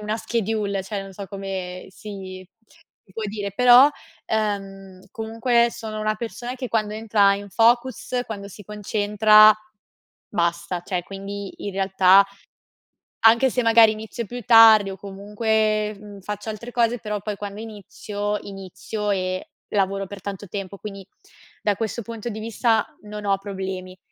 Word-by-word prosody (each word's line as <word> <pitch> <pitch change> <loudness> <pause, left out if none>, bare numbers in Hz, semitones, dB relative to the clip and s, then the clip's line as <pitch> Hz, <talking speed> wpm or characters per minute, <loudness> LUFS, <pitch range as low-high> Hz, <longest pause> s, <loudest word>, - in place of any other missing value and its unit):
una 210 +1 -2
schedule, 215 -3 -2
cioè, 195 +1 -4
non 195 0 -10
so 195 +1 -8
come 190 -2 -6
si 190 -2 -9 0.6
si 190 - -21
può 220 - -5
dire, 205 -1 -4
però, 250 +5 +7 0.4
ehm, 195 -3 -3
comunque 230 +2 +1
sono 220 -2 -6
una 215 0 0
persona 240 +2 -5
che 255 - -4
quando 215 -2 0
entra 210 -2 +3
in 200 0 -8
focus, 240 +3 +2
quando 200 -4 -7
si 205 +2 -12
concentra, 210 +1 +5 0.7
basta, 170 -1 -1
cioè 180 -2 -2
quindi, 195 0 -7
in 200 - -3
realtà 190 0 +5 1.0
anche 235 +4 +5
se 250 - 0
magari 225 -1 +6
inizio 220 +2 -6
più 245 +4 -7
tardi 220 -3 +8
o - - -6
comunque, 210 +2 -1
mhmm, 205 -1 -11
faccio 210 +2 -6
altre 220 +3 -7
cose, 240 0 +1
però 210 -1 -3
poi 210 0 -4
quando 205 +1 -7
inizio, 205 -1 -5
inizio 200 +2 -5
e 185 -1 -2 0.2
lavoro 195 -1 0
per 200 0 -9
tanto 200 +1 -6
tempo, 195 0 -6
quindi 195 -1 -8 0.6
da 205 -1 +1
questo 225 +2 -3
punto 230 +1 -6
di 220 -1 -6
vista 225 0 +1 0.2
non 210 0 -7
ho 195 -1 +2
problemi. 190 -2 -6
210 Hz, 150 wpm, -23 LUFS, 195-220 Hz, 1.0 s, tardi